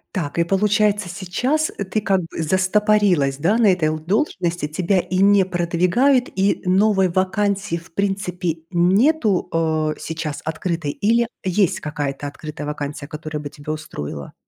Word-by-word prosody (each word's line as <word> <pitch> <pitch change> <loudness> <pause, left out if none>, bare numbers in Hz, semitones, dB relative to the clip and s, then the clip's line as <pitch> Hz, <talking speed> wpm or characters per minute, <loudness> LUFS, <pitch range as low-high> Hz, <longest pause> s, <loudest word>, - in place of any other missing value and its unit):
Так 165 -4 -3
и, 170 - +5
получается, 205 +1 +1
сейчас 250 - -1 0.2
ты 215 - +1
как 195 -2 +1
бы 165 -1 -6
застопорилась, 185 -4 +2
да, 175 +9 +2
на 235 -2 +4
этой 170 -4 +1
л 155 0 -2
должности, 175 - -1
тебя 180 +5 +1
и 185 +1 -2
не 200 0 +5
продвигают 180 +9 +2
и 195 +1 +1
новой 190 0 +3
вакансии, 195 +1 0
в 165 -1 -14
принципе, 180 -4 -2
нету, 195 - +3
а, 155 -2 0
сейчас 160 -2 -5
открытой 160 -1 -2
или 230 +7 +1 0.2
есть 190 0 +1
какая-то 145 -1 -4
открытая 150 +1 -7
вакансия, 145 -1 -5
которая 155 0 -6
бы 145 - -5
тебя 150 +1 -6
устроила? 75 - -7
180 Hz, 145 wpm, -21 LUFS, 155-200 Hz, 0.2 s, и